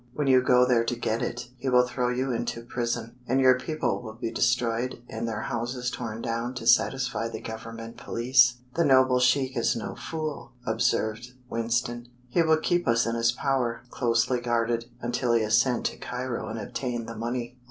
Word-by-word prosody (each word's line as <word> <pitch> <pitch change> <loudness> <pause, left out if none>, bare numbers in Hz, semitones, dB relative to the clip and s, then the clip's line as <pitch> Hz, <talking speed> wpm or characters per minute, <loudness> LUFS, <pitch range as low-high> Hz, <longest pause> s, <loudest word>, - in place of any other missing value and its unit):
When 150 - -1
you 130 -1 +5
go 125 0 +5
there 120 -2 +3
to 120 - -1
get 115 0 -1
it, 120 0 -4
he 130 +2 -2
will 125 0 +5
throw 125 0 -1
you 130 +2 -1
into 115 0 -3
prison, 120 0 -3
and 130 +2 +2
your 130 -1 +5
people 145 -3 -2
will 110 -2 -8
be 115 0 -4
destroyed 120 0 0
and 115 +1 -4
their 110 -1 -3
houses 125 +2 -3
torn 115 -2 -5
down 115 +1 -2
to 120 - -6
satisfy 125 0 +2
the 110 -1 -6
Government 115 +1 -8
police." 120 0 +3 0.2
"The 170 - +2
noble 130 -3 +5
sheik 130 +1 +2
is 115 - +1
no 115 - -4
fool," 155 -5 -5
observed 110 +2 0 0.2
Winston. 120 +1 -1 0.2
"He 170 - +2
will 160 -1 +4
keep 175 +1 0
us 115 0 +3
in 115 - -1
his 115 0 +2
power, 120 -2 -1
closely 120 0 +1
guarded, 120 -1 0 0.2
until 120 0 0
he 115 -1 +3
has 110 0 +4
sent 125 -2 -1
to - - -1
Cairo 125 -1 -4
and 110 - -5
obtained 120 +2 -4
the 115 - -6
money. 120 +2 -4
120 Hz, 190 wpm, -27 LUFS, 115-125 Hz, 0.2 s, you